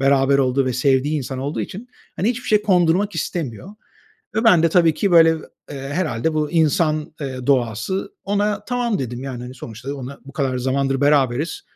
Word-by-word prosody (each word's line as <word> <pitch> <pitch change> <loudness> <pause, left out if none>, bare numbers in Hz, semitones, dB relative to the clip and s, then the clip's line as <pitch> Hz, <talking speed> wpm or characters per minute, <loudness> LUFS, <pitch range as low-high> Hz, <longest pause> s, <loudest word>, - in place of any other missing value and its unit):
beraber 135 0 +3
olduğu 135 0 +2
ve 130 - 0
sevdiği 135 +4 +1
insan 130 0 -5
olduğu 140 +3 -3
için, 225 +7 -7 0.3
hani, 205 - +1
hiçbir 250 0 -5
şey 210 -1 +3
kondurmak 185 0 +2
istemiyor 160 - -4 0.7
ve 220 - +1
ben 180 -8 +5
de 165 - +4
tabii 165 -2 +4
ki, 200 +2 0
böyle, 165 -1 +7 0.4
eee, 140 - -6 0.2
herhâlde 155 -4 -1
bu 155 0 -1
insan, 155 -1 +1
eee, 130 -2 -5
doğası, 130 - 0
ona, 205 +1 0
“tamam” 245 - -1
dedim. 125 0 -4
Yani, 125 -3 -6
hani, 125 +1 -8
sonuçta 120 +3 -7
ona, 135 +1 -8
bu 140 - -12
kadar 130 -3 -1
zamandır 135 +1 0
beraberiz. 145 +1 +2
145 Hz, 180 wpm, -21 LUFS, 130-180 Hz, 0.7 s, böyle